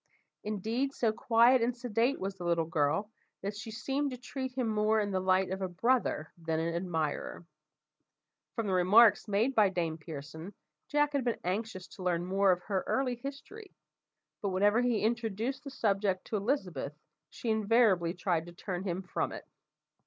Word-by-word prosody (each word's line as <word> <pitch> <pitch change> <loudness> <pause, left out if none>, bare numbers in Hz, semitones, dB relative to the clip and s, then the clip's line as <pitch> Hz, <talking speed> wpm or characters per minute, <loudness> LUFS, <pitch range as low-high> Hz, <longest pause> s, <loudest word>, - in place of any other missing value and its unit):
Indeed, 225 +6 -1
so 230 -3 +2
quiet 235 +1 +4
and 240 +1 0
sedate 240 +2 0
was 195 +1 -3
the 185 -2 -9
little 170 -1 +1
girl, 160 +7 0 0.3
that 200 +1 -3
she 220 +2 -7
seemed 270 +5 -1
to 255 - -6
treat 260 +1 -5
him 250 -2 -1
more 215 0 +2
in 205 -1 -1
the 190 - +1
light 185 0 +2
of 190 +1 -3
a 190 - 0
brother 185 -3 0
than 160 -1 -1
an 165 +1 -1
admirer. 170 -1 -2 1.1
From 230 - -1
the 195 - 0
remarks 205 +6 +6
made 215 +6 +1
by 215 -5 +5
Dame 165 -3 -2
Pearson, 160 +4 -8 0.3
Jack 295 0 +2
had 280 -2 +1
been 235 -1 0
anxious 185 0 -3
to 190 - -10
learn 175 -1 0
more 195 +1 +3
of 180 0 0
her 195 -2 -1
early 260 -2 +1
history, 285 - -9 0.7
but 200 - -1
whenever 205 +5 +3
he 245 -3 +1
introduced 230 +4 -1
the 280 - -6
subject 200 -7 0
to - - -4
Elizabeth, 195 - -1 0.4
she 230 - -3
invariably 215 -5 +3
tried 175 -3 -1
to 175 - -10
turn 180 0 -4
him 185 -1 -3
from 180 - -2
it. - - -8
205 Hz, 175 wpm, -31 LUFS, 180-235 Hz, 1.1 s, remarks